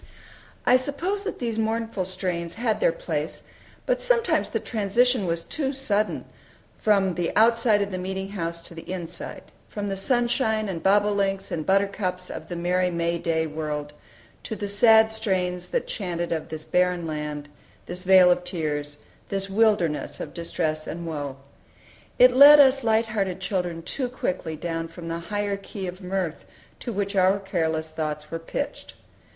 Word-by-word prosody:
I 250 - +6
suppose 330 +10 -2
that 415 - -3
these 230 -3 -2
mournful 225 -3 -1
strains 175 -2 -3
had 225 0 0
their - - +4
place, - - -4 0.4
but - - +1
sometimes - - +2
the - - -1
transition 230 0 +1
was 165 0 -1
too 275 -4 -2
sudden, 215 -6 -1 0.5
from 195 -3 +3
the 175 0 -1
outside 225 -1 +4
of 200 - -5
the 185 - -3
meeting 190 +1 -4
house 170 -4 -4
to 170 - -9
the 170 +2 -8
inside; 175 -3 -5 0.3
from 205 -1 -4
the 195 -1 -2
sunshine 235 0 +1
and 170 -4 -4
bobolinks 200 -1 +2
and 155 -2 -3
buttercups 190 -2 0
of - - -7
the 175 - -5
merry 180 +1 +1
May 170 0 -1
day 165 -1 0
world, 150 -1 -4 0.5
to 220 - -5
the 205 - -4
sad 220 +2 +5
strains 185 -5 -1
that - - -1
chanted 175 -4 -3
of 160 -2 -2
"this 155 0 -6
barren 180 -1 +1
land," 150 -2 -4 0.4
this 180 +1 -5
"vale 185 -1 +7
of 180 0 +1
tears," 150 -4 -3 0.3
this 195 0 -1
"wilderness" 205 -7 +1
of - - -6
distress 160 -2 -2
and 170 +1 -5
woe. 145 -4 -4 0.8
It 250 0 +8
let 285 +3 +9
us 270 -1 +6
light 225 0 +3
hearted 195 -4 -2
children 180 -3 -2
too 255 +7 -3
quickly 180 -9 -3
down 165 +1 -3
from 165 0 -9
the 165 0 -3
higher 205 -1 -1
key 195 0 -7
of 180 +2 -6
mirth 180 -3 -3 0.4
to 240 - -4
which 200 -1 -2
our 190 +1 +4
careless 160 -5 -2
thoughts 150 -1 -4
were 165 - -3
pitched. 165 - -5
190 Hz, 165 wpm, -25 LUFS, 170-220 Hz, 0.8 s, let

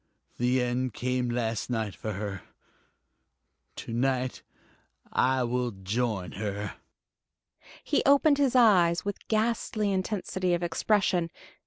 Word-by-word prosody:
The 125 +1 +2
end 125 -1 -1
came 125 0 -1
last 115 -2 -2
night 110 -4 -2
for 110 - -4
her 100 -1 -5 1.3
to 115 - -7
night 130 +1 0 0.7
I 130 0 +2
will 125 0 0
join 100 -1 -2
her." 105 0 -4 1.1
He - - +1
opened 285 +1 +5
his 270 -3 +2
eyes 185 -8 +5
with 205 -1 -5
ghastly 220 -2 0
intensity 185 -2 -1
of 175 - -4
expression. 175 0 +1
125 Hz, 115 wpm, -28 LUFS, 115-190 Hz, 1.3 s, opened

